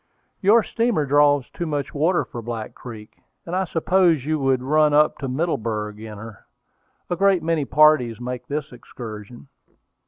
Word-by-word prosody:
"Your 215 +4 +5
steamer 230 -10 0
draws 145 -1 +3
too 170 - -4
much 145 -3 -3
water 165 +5 +1
for 120 - -8
Black 115 -1 -6
Creek, 110 -3 -11 0.3
or 170 - -7
I 190 +1 0
suppose 170 -3 +2
you 155 0 0
would 135 -2 +1
run 150 +2 +3
up 150 +1 +3
to 135 - -4
Middleburg 115 -8 -2
in 110 -1 -9
her. 110 -1 -11 0.6
A - - +1
great 195 -1 +2
many 160 -3 0
parties 135 -5 +4
make 125 0 -6
this 150 +1 -4
excursion." 120 -1 -10
145 Hz, 160 wpm, -22 LUFS, 120-160 Hz, 0.6 s, Your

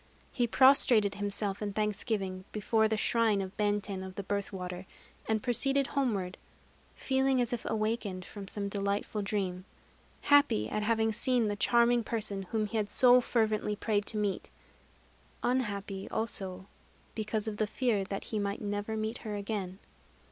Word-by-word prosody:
He 245 -2 +1
prostrated 240 -5 +5
himself 205 0 -3
in 205 -1 -3
thanksgiving 205 -2 -2
before 220 +1 +2
the 220 0 0
shrine 225 -2 +2
of 190 0 -5
Benten 205 -2 -1
of 190 0 -8
the 200 - -4
Birth 200 0 -2
Water, 180 -1 -6 0.4
and 220 -1 0
proceeded 275 +3 +2
homeward, 210 -11 -1 0.6
feeling 265 0 +1
as 245 0 0
if 235 - -3
awakened 215 -4 -2
from 200 0 -9
some 200 0 -1
delightful 200 +1 -2
dream, 195 -3 -2 0.6
happy 285 - +4
at 215 - -2
having 220 +1 +2
seen 245 -2 +1
the 205 - -1
charming 235 +3 +3
person 205 -4 -3
whom 220 -2 0
he 220 +2 -3
had 210 -1 -1
so 250 +2 +6
fervently 215 -3 0
prayed 205 -1 -1
to 220 - 0
meet, 205 -2 -1 0.9
unhappy 200 -6 -1
also 195 -4 -4 0.5
because 215 0 -1
of 210 -1 -3
the 215 - +1
fear 225 -3 0
that 195 +1 -5
he 215 - -3
might 200 0 -2
never 205 +1 -3
meet 220 +2 -3
her 215 -2 -5
again. 200 -2 -4
210 Hz, 155 wpm, -31 LUFS, 200-230 Hz, 0.9 s, so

